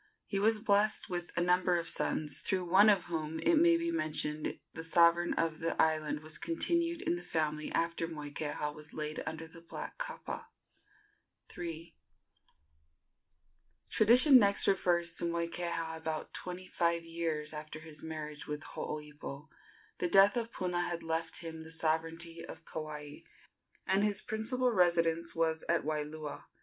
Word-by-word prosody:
He 195 - -2
was 220 +2 +4
blessed 210 -2 +1
with 175 -1 -3
a - - +3
number 180 0 +3
of 170 -1 -3
sons, 155 -2 0
through 185 -2 -1
one 195 +5 +7
of 195 -4 +4
whom, 160 -2 -4
it 340 - +3
may 335 +1 +6
be 335 0 -1
mentioned, 155 - -1 0.2
the 160 - -6
sovereignty 170 +1 +4
of 165 -1 0
the 165 0 -2
island 155 -1 +1
was 155 0 -4
continued 335 0 +1
in 175 - 0
the - - -6
family 155 -3 -2
after 165 0 0
Moikeha 150 -1 -4
was 150 0 -8
laid 155 0 -3
under 160 0 -4
the 165 +1 -11
black 170 - -8
kapa. - - -5 1.1
III. 165 -1 -6 2.0
Tradition 250 +5 +8
next 200 -2 +3
refers 175 -3 +2
to - - 0
Moikeha 170 -1 -2
about 160 -1 -4
twenty 180 0 -6
five 170 -2 0
years 165 -2 -3
after 155 0 -7
his 155 -1 -8
marriage 155 -2 -6
with 150 +1 -4
Hooipo. 150 0 -7 0.5
The 180 - +1
death 195 +4 +6
of 235 -1 -2
Puna 180 -1 -1
had 175 -1 -3
left 165 +1 -2
him 160 -1 -7
the 160 - -10
sovereignty 165 +1 -1
of - - -10
Kauai, 150 -2 -6 0.7
and 195 +2 +2
his 205 -2 +2
principal 245 +4 0
residence 170 -4 +2
was 160 -1 +1
at 170 0 +2
Waialua. 150 -1 -4
165 Hz, 150 wpm, -32 LUFS, 155-185 Hz, 2.0 s, Tradition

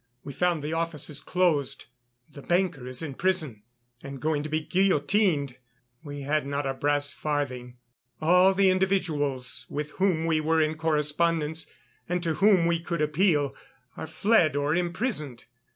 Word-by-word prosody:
We 140 - -7
found 175 0 0
the 150 +2 -3
offices 165 -3 -3
closed; 170 -7 0 0.4
the 140 - -12
banker 175 -6 0
is 130 +5 -5
in 150 -4 -5
prison 155 - -1 0.4
and 140 -1 -8
going 155 0 0
to 155 - -6
be 155 +1 0
guillotined. 165 - +1 0.5
We 145 -2 -7
had 150 +2 0
not 140 0 -2
a 135 - -1
brass 145 +1 0
farthing. 125 -5 -3 0.4
All 180 +4 +4
the 195 -1 +4
individuals 155 -9 -1
with 150 +1 -4
whom 175 -5 +2
we 160 -1 +1
were 160 +1 +2
in 155 0 +2
correspondence 160 0 0 0.4
and 175 0 -1
to 165 -2 0
whom 195 0 +4
we 170 0 +1
could 170 0 -4
appeal 150 -2 +2 0.4
are - - -6
fled 160 - +2
or 145 +2 +1
imprisoned. 175 - -2
155 Hz, 150 wpm, -27 LUFS, 145-175 Hz, 0.5 s, All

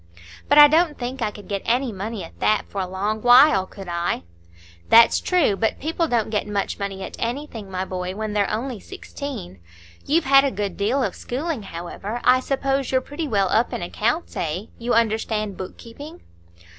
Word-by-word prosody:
"But 290 - +4
I 295 0 +11
don't 315 +1 +2
think 250 +1 -5
I 220 - +1
could 205 0 -12
get 200 -1 -3
any 250 +1 +1
money 205 0 -5
at 165 - -13
that 215 - +2
for 200 - -4
a 185 - -3
long 205 +4 -2
while, 245 -5 +6
could 195 -2 -11
I?" 170 - -2 0.7
"That's 230 0 +7
true; 350 - +2
but 220 +2 -1
people 325 +2 -1
don't 230 -5 0
get 210 -1 -1
much 205 0 -2
money 195 -1 -4
at - - -7
anything, 235 -4 -4
my 185 0 -3
boy, 185 0 -4
when 215 0 -4
they're 205 -1 +1
only 240 +1 -3
sixteen. 280 - -8 0.4
You've 320 +3 +1
had 275 0 +6
a 280 - +2
good 200 -4 -4
deal 240 +7 0
of - - -1
schooling, 280 +1 -4
however; 195 +5 -6
I 255 +1 +5
suppose 270 0 -1
you're 260 - +3
pretty 290 +4 -5
well 200 -6 +1
up 230 +2 +1
in - - -3
accounts, 235 - -2
eh? 170 +3 -2 0.2
You 240 0 0
understand 220 -2 0
book 185 - -8
keeping?" 290 +9 -11
225 Hz, 195 wpm, -22 LUFS, 200-270 Hz, 0.7 s, I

